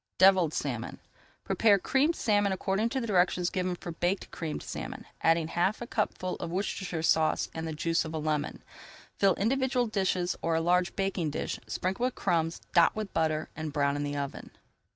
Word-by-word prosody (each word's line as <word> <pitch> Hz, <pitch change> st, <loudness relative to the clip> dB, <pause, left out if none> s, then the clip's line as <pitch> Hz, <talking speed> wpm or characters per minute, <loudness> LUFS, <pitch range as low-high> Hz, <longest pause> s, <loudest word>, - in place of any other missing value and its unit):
DEVILLED 185 Hz, -4 st, +6 dB
SALMON 120 Hz, -7 st, -3 dB, 0.5 s
Prepare 210 Hz, -3 st, +4 dB
Creamed 275 Hz, -, +2 dB
Salmon 205 Hz, -2 st, +2 dB
according 195 Hz, +4 st, 0 dB
to 265 Hz, -, -1 dB
directions 180 Hz, -5 st, +2 dB
given 185 Hz, -1 st, -1 dB
for 175 Hz, -, -7 dB
Baked 175 Hz, +4 st, -1 dB
Creamed 160 Hz, -3 st, -4 dB
Salmon, -, -, -6 dB, 0.2 s
adding 165 Hz, -1 st, +3 dB
half 175 Hz, +5 st, +1 dB
a 240 Hz, -, -5 dB
cupful 210 Hz, -6 st, -2 dB
of -, -, -5 dB
Worcestershire 180 Hz, -2 st, -2 dB
Sauce 160 Hz, -1 st, +2 dB
and 160 Hz, 0 st, -4 dB
the 160 Hz, -, -3 dB
juice 165 Hz, +2 st, +1 dB
of 160 Hz, 0 st, -6 dB
a -, -, -1 dB
lemon. 150 Hz, -1 st, -2 dB, 0.6 s
Fill 195 Hz, -3 st, +4 dB
individual 255 Hz, +3 st, +1 dB
dishes 190 Hz, -4 st, 0 dB
or 165 Hz, 0 st, +1 dB
a -, -, +3 dB
large 175 Hz, +2 st, +2 dB
baking 195 Hz, -4 st, -1 dB
dish, 145 Hz, -, -3 dB
sprinkle 190 Hz, +6 st, -1 dB
with 255 Hz, -, -1 dB
crumbs, 165 Hz, -3 st, 0 dB
dot 170 Hz, -2 st, +5 dB
with 215 Hz, -2 st, -4 dB
butter, 155 Hz, -1 st, 0 dB
and 155 Hz, -1 st, -4 dB
brown 140 Hz, -1 st, +1 dB
in 145 Hz, -, -2 dB
the 145 Hz, 0 st, -2 dB
oven. 140 Hz, -1 st, -5 dB
180 Hz, 180 wpm, -29 LUFS, 160-200 Hz, 0.6 s, DEVILLED